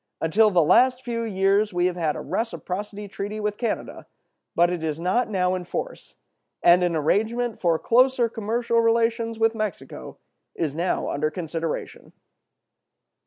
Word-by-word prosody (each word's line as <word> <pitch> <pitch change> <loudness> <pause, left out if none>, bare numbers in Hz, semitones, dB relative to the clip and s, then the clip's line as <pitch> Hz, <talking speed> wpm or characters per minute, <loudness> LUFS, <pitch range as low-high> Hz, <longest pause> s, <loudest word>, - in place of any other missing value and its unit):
Until 210 +7 +3
the 180 -4 +3
last 250 +10 +4
few 235 -2 -3
years 200 -1 +1
we 175 0 +1
have 180 -1 0
had 160 -4 -1
a - - -5
reciprocity 205 -2 -4
treaty 205 +2 -5
with 210 -1 -2
Canada, 235 - -4 0.5
but 175 +1 +4
it 175 -2 -3
is 155 -1 -2
not 185 +9 0
now 185 -3 +1
in 185 -1 -3
force; - - -6 0.5
and 175 +1 +6
an 175 -2 +1
arrangement 220 +9 0
for 170 -3 +2
closer 250 +4 +3
commercial 230 +1 0
relations 230 0 +1
with 225 0 +2
Mexico 210 - -6 0.4
is 155 -4 -2
now 170 +4 -1
under 155 +2 -1
consideration. 165 -1 -5
205 Hz, 150 wpm, -24 LUFS, 175-230 Hz, 0.5 s, and